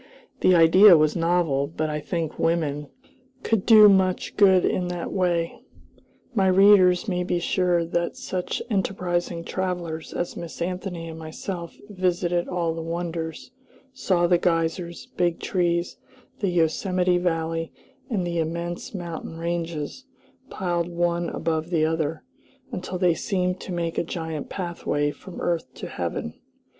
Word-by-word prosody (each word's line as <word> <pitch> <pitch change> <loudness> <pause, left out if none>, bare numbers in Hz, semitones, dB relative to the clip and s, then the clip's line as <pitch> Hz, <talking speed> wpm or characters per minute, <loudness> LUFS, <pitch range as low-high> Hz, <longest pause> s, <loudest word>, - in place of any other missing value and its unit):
The 185 - +5
idea 175 +3 +8
was 155 0 +2
novel, 165 -5 +1
but 155 0 -3
I 150 - -2
think 165 0 -4
women 150 -3 0 0.6
could 225 -4 0
do 215 -2 +9
much 190 -2 +2
good 190 -3 +5
in 180 - 0
that 175 -1 -4
way. 175 -3 0 0.7
My 195 -5 +2
readers 185 0 +6
may 180 -3 0
be 175 0 0
sure 175 -1 +1
that 170 +1 -2
such 180 -1 -3
enterprising 180 -4 -1
travelers 175 -4 -3
as 175 - -3
Miss 170 -2 -7
Anthony 180 -1 -4
and 160 0 -8
myself 170 +2 -6
visited 180 -3 0
all 170 -2 -1
the 165 - -5
wonders, 165 +2 -4 0.4
saw 185 -9 +1
the 175 0 +3
geysers, 170 0 -1
big 175 -1 +1
trees, 175 -2 0 0.4
the 200 - 0
Yosemite 180 +2 +1
Valley, 165 -2 -1 0.4
and 200 -7 -1
the 170 -1 -2
immense 170 +4 -4
mountain 170 -2 -6
ranges, 170 - -4 0.4
piled 175 -2 -1
one 175 0 -1
above 160 +1 -2
another, 160 -1 0 0.5
until 180 -4 -4
they 180 -2 +3
seemed 180 +1 -1
to - - -8
make 170 -2 -2
a - - +1
giant 160 -3 -5
pathway 170 -5 -2
from 180 +4 -11
earth 170 -2 -1
to - - -7
heaven. 75 - -4
175 Hz, 140 wpm, -24 LUFS, 165-180 Hz, 0.7 s, do